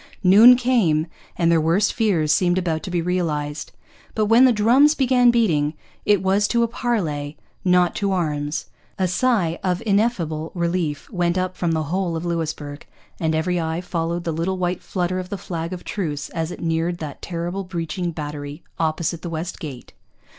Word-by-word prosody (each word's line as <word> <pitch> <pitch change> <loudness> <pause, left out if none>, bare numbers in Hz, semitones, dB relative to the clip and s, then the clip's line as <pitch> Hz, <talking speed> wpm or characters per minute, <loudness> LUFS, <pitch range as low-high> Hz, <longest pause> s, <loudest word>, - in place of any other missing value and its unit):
Noon 215 +7 +8
came, 230 -12 +2 0.3
and 170 -1 +3
their 165 -1 +4
worst 170 +6 +2
fears 180 -10 +1
seemed 175 +3 +2
about 165 -4 -1
to - - -6
be 175 -2 -1
realized. 155 -5 -2 0.4
But 215 - +2
when 230 +4 +6
the 255 - +6
drums 245 +8 +4
began 250 -2 +4
beating, 165 -11 +2 0.3
it 205 -3 +3
was 195 +2 +2
to 235 -1 +2
a - - +2
parley, 165 - -2 0.3
not 180 -1 +3
to 200 -1 0
arms. 150 -5 -1 0.3
A 185 - +1
sigh 180 -3 +1
of 180 -2 -1
ineffable 195 -7 0
relief 170 -4 -1
went 175 -2 0
up 185 0 -1
from 170 -2 -1
the 160 -1 0
whole 175 +2 -2
of 165 +1 -4
Louisbourg, 155 -4 -4 0.4
and 160 -1 0
every 175 +2 0
eye 160 +1 -2
followed 170 -1 -3
the 165 - -2
little 170 +4 -1
white 180 0 -1
flutter 185 0 -2
of 180 0 -6
the 200 - -4
flag 170 -2 -5
of 180 -1 -6
truce 150 -8 -4
as 165 -1 -3
it 180 - -8
neared 165 +1 0
that 150 -4 -7
terrible 175 +2 -4
breaching 175 -1 -3
battery 145 -1 -6 0.2
opposite 160 +1 -1
the 175 - -5
West 165 +2 -5
Gate. 140 -9 -8
175 Hz, 180 wpm, -22 LUFS, 160-190 Hz, 0.4 s, Noon